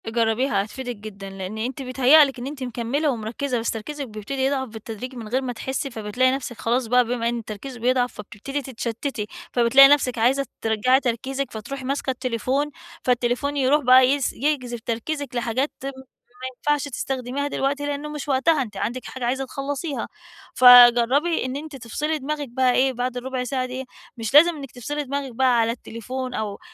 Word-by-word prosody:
جَرَّبيها 225 -1 +1
هَتفيدِك 245 +3 -6
جدًا 200 -2 -9
لأن 195 +2 -6
أنتِ 250 +5 -3
بيتهيأ 270 +4 +6
لِك 270 -2 -6
إن 245 - -5
أنتِ 280 -2 -6
مكَمّلة 250 +5 -1
ومرَكَّزة 240 +2 -2
بس 230 - -1
تركيزِك 280 +5 -5
بَيبتَدي 215 +5 -5
يضعَف 270 -1 0
بالتدريج 225 +3 -8
من 230 -3 -7
غَير 255 +5 0
ما 255 -2 -3
تحسّي 265 +3 -3
فَبتلاقي 230 +3 +1
نَفسِك 260 -3 -4
خلاص 240 +1 0
بقى 250 +1 +4
بَما 235 0 -1
إن 240 - -2
التركيز 230 +4 -8
بَيضعَف 250 +1 +1
فَبتبتدي 215 +7 -6
تتشَتَّتي، 235 -2 -4 0.2
فَبتلاقي 250 +3 +7
نَفسِك 275 -4 +3
عايزة 260 +5 +2 0.2
ترَجَّعي 225 +4 +3
تركيزِك 265 +1 -2
فَتروحي 260 +5 -6
ماسكة 275 +1 -2
التليفون، 255 +3 -1 0.3
فالتليفون 250 +3 0
يَروح 280 +2 +3
بقى 255 +1 +7
يس 280 -1 +1
يجذَب 255 -4 -1
تركيزِك 250 +4 -4
لحاجات 240 +4 0
تم 275 +1 -4 0.5
ما 260 - -3
يَنفَعش 295 -1 0
تستخدميها 265 +1 -3
دلوقتي 280 0 -1
لأنُّه 290 +1 -3
مش 300 0 -6
وقتها 275 +3 +3
أنتِ 230 -5 -6
عندِك 245 +2 -3
حاجة 260 -2 -5
عايزة 265 +2 -1
تخَلَّصيها، 275 0 -4 0.5
فَجَرَّبي 245 +5 +7
إن 255 +1 -3
أنتِ 300 +1 -7
تفصَلي 285 +6 -2
دماغِك 290 0 -4
بقى 255 +1 +2
إيه 265 +1 +3
بَعد 250 0 -3
الرُبَع 255 0 -3
ساعة 255 +1 -2
دي 255 +1 -6 0.3
مش 225 +1 -4
لازم 335 +4 +7
إنِّك 275 -4 -8
تفصَلي 290 +5 -4
دماغِك 280 -1 -4
بقى 255 -1 +3
على 230 0 +2
التليفون 250 +2 -6
أو 210 -3 -4
255 Hz, 175 wpm, -23 LUFS, 235-275 Hz, 0.5 s, فَبتلاقي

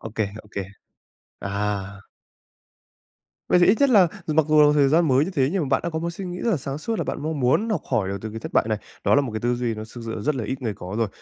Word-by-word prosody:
Ô - - -6
kê, 110 - +1 0.2
ô 105 - -19
kê. 100 - -2 0.8
À! 100 0 -4 1.4
Vậy - - +5
thì 175 - +5
ít 200 - +6
nhất 280 - +5
là 195 -7 +6 0.2
dù 155 - -1
mặc 160 0 +4
dù 150 -1 +6
thời 145 -2 +4
gian 160 +3 +3
mới 135 +2 +4
như 190 - -4
thế 135 -6 +1
nhưng 190 -4 0
mà 140 - -3
bạn - - +3
đã 170 - -1
có 160 - -3
một 170 +1 -2
suy 185 +3 -7
nghĩ 180 0 -5
rất 235 - 0
là 190 - +2
sáng 135 +1 -5
suốt 225 +7 -3
là - - -1
bạn - - -4
mong 155 -1 -3
muốn 135 - +2
học 215 - 0
hỏi 110 -7 +1
được 100 +1 -3
từ 110 +1 -6
cái 110 - -7
thất - - -7
bại - - +3
này. 110 - 0 0.3
Đó - - +4
là 145 - +5
một 135 -5 -4
cái 110 - -3
tư 120 +1 +1
duy 120 -2 -2
nó 110 - -6
thực 120 - -7
sự 110 -1 -4
rất 150 +5 +1
là 125 -4 -3
ít 130 +5 -4
người 110 -4 -2
có 90 +2 -7
rồi. 115 - +1
135 Hz, 305 wpm, -23 LUFS, 110-160 Hz, 1.4 s, ít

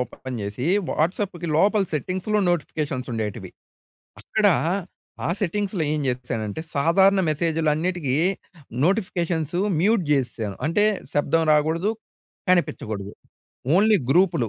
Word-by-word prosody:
Open 125 0 -5
చేసీ, 105 +8 -4 0.2
వాట్సాప్పుకి 175 +1 -1
లోపల 205 +4 +4
సెట్టింగ్స్‌లో 185 - -1
నోటిఫికేషన్సుండేటివి. 130 - -3 0.7
అక్కడా 210 -3 +2 0.7
ఆ - - -1
సెట్టింగ్స్‌లో 200 -1 -1
ఏం 155 - -1
జేశానంటే, 120 -2 -3
సాధారణ 190 +7 +4
మెసేజులన్నిటికీ 160 -1 0 0.7
నోటిఫికేషన్సు 175 -4 0 0.2
మ్యూట్ 205 -1 +3
జేసేశాను. 120 -7 -1
అంటే, 205 +6 +2 0.3
శబ్దం 165 +3 +2
రాగూడదు, 160 +7 +2 0.6
కనిపిచ్చగూడదు, 110 - 0 0.6
ఓన్లీ 215 +2 +5
గ్రూపులు. 170 - +3
165 Hz, 90 wpm, -23 LUFS, 130-185 Hz, 0.7 s, ఓన్లీ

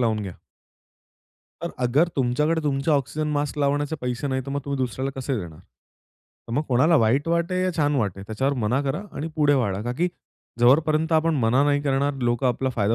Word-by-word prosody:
लावून 110 -3 +1
घ्या. 95 -3 -6 1.3
तर - - -3
अगर 140 +8 +3
तुमच्याकडे 150 +5 +1
तुमच्या 145 +1 +1
ऑक्सिजन 150 +2 -1
मास्क 145 0 -2
लावण्याचे 145 +2 0
पैसे 125 +2 -3
नाही, 130 -1 -1
तर - - -5
मग 140 +1 -2
तुम्ही 140 -1 -2
दुसऱ्याला 130 +1 -2
कसे 135 +1 -2
देणार? 85 -5 -8 0.9
तर - - -5
मग 145 - +1
कोणाला 140 +7 +4
वाईट 135 +5 +2
वाटे 170 +2 0
या 185 - +1
छान 145 -1 +2
वाटे 100 -6 -2
त्याच्यावर 110 +7 -1
मना 120 +6 +1
करा 145 +7 -2
आणि 155 - -3
पुढे 145 -2 +4
वाढा. 105 -7 0
का 120 +2 -2
की 175 +2 +2 0.5
जोपर्यंत 155 +6 +3
आपण 160 0 +3
मना 120 +4 +3
नाही 145 0 +2
करणार 140 0 +1
लोकं 120 +1 +1
आपला 130 +2 0
फायदा 110 -2 +1
140 Hz, 190 wpm, -24 LUFS, 120-150 Hz, 1.3 s, कोणाला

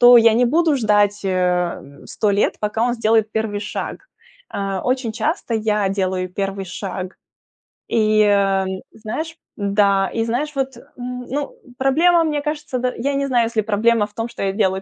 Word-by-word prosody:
то 245 0 +9
я 230 -1 +6
не 245 - +4
буду 315 +3 +3
ждать, 205 -3 +2
э, - - 0 0.5
м, 140 +1 -15
100 210 -2 0
лет, 200 - +1
пока 210 +1 -1
он 240 0 +2
сделает 220 -2 +2
первый 220 -2 -1
шаг. 205 - -5 0.5
Э, 195 -1 -2
очень 255 -3 -1
часто 235 0 -2
я 210 -2 +1
делаю 185 -1 -1
первый 195 0 -3
шаг. 185 0 -6 0.7
И, 215 -1 +3
э, 195 -2 +3 0.3
знаешь 310 +10 -5 0.3
да, 200 -1 +2
и, 225 - 0
знаешь, 265 +7 -2
вот, 265 -2 -2
м, 250 +1 -8
ну, 285 +2 -3 0.2
проблема, 330 +6 +4
мне 300 -2 -1
кажется, 300 -3 -3
да, 250 0 -1
я 280 +4 -1
не 275 - 0
знаю, 245 -3 +3
если 230 -1 -2
проблема 215 +1 +2
в 210 - -26
том, 225 +2 -3
что 235 - -8
я 195 0 0
делаю 190 -2 +1
220 Hz, 180 wpm, -20 LUFS, 200-250 Hz, 0.7 s, то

